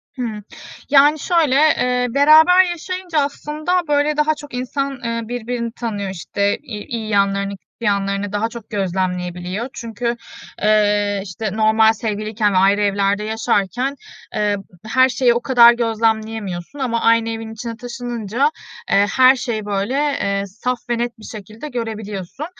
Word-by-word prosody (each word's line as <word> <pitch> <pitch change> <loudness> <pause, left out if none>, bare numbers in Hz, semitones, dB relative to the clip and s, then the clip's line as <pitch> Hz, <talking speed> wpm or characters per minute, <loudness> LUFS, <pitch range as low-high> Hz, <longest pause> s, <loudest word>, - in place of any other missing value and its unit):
Hıı. 220 -5 -4 0.5
Yani, 290 +2 +5
şöyle, 320 -6 +2
eee, 250 -4 +3
beraber 315 +7 +6
yaşayınca 355 -1 -3
aslında, 305 +5 -1
böyle, 295 +1 +1
daha 305 +1 +2
çok 290 -3 -12
insan, 270 +1 -3
eee, 230 0 -2
birbirini 240 -1 -3
tanıyor. 210 -5 -4
İşte, 200 +2 -1
i 240 -8 -8
iyi 225 -2 -5
yanlarını, 200 -1 +1
kötü - - -53
yanlarını 200 0 0
daha 220 +2 0
çok 230 -2 -10
gözlemleyebiliyor. 185 +2 -3
Çünkü, 235 +1 -3 0.5
eee, 205 -1 +2
işte, 205 +2 -4
normal 220 0 +4
sevgiliyken 215 -1 -1
ve - - +2
ayrı 200 +2 +4
evlerde 200 0 +1
yaşarken, 225 +4 -1 0.4
eee, 210 -1 +1 0.3
her 260 +3 +4
şeyi 245 -2 +3
o 240 - -1
kadar 240 -2 +7
gözlemleyemiyorsun 220 -2 -2
ama 235 -3 -1
aynı 230 0 +3
evin 225 0 -5
içine 230 0 -6
taşınınca, 240 +1 -2 0.4
eee, 200 +1 +5
her 260 +1 +7
şeyi, 225 -5 -3
böyle, 200 +4 -2
eee, 200 -9 0
saf 245 +6 -3
ve 240 - +1
net 240 -1 -3
bir - - -14
şekilde 215 +6 -9
görebiliyorsun. 220 - -5
225 Hz, 145 wpm, -19 LUFS, 205-255 Hz, 0.5 s, kadar